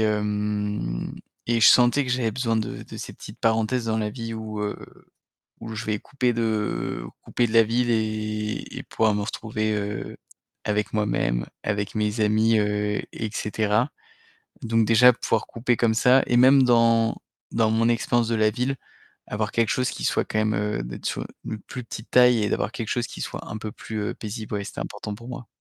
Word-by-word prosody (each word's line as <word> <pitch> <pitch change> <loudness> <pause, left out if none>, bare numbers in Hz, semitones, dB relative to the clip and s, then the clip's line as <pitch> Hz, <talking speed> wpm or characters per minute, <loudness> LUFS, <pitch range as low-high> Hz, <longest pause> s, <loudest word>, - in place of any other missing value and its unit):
hem, 105 - -1 0.3
et 115 -1 +2
je - - +8
sentais 125 +3 +6
que 125 - -4
j'avais 120 -3 +1
besoin 115 -1 0
de 110 - -3
de - - -10
ces - - -7
petites - - -11
parenthèses 115 +2 +1
dans 110 0 0
la 105 -1 -1
vie 115 0 -6
où, 110 -1 -5
heu, 105 - -2 0.8
où 115 0 -7
je 110 +2 -5
vais 105 -1 -1
couper 125 -3 -1
de 110 - -1 0.2
couper 120 - 0
de 110 - -3
la 115 - +8
ville 120 +2 +1
et 110 -1 -2
et - - -3
pouvoir 110 -1 +1
me 105 - -1
retrouver, 110 +1 -2
heu, 105 -1 -4 0.5
avec 105 -1 -1
moi-même, - - 0 0.2
avec 105 -1 -2
mes 105 +1 0
amis, 110 +1 +3
heu, 105 0 0
et 110 - -4
cetera. 110 +4 0 0.7
Donc 115 -1 +2
déjà, 125 +3 +7
pouvoir 115 -2 -1
couper 120 0 -1
comme 115 -2 +3
ça 125 +4 +5
et 120 - +2
même 130 +2 +7
dans 115 -2 +4 0.4
dans 115 -1 +2
mon 110 +1 +2
expérience 120 0 +1
de 115 - +1
la 110 -1 +4
ville, 125 +5 -1 0.5
avoir 105 0 -2
quelque 115 -2 +2
chose 130 0 +1
qui - - -6
soit - - +1
quand 110 - -2
même, 110 0 +1
heu, 105 -11 -1
d'être - - -7
sur - - -2
u - - -5 0.2
une 110 - -4
plus 125 - -7
petite 110 0 -9
taille 125 -2 +6
et 105 - 0
d'avoir - - -1
quelque 115 -3 -5
chose 120 -1 0
qui - - -7
soit - - -6
un 105 - -4
peu 110 0 -6
plus, 110 0 -6
heu, - - -2
paisible, 110 0 -6
ouais, 100 -1 -2
c'était - - -7
important 105 - -5
pour 115 +3 -11
moi. 125 -1 -7
110 Hz, 200 wpm, -25 LUFS, 105-115 Hz, 0.8 s, je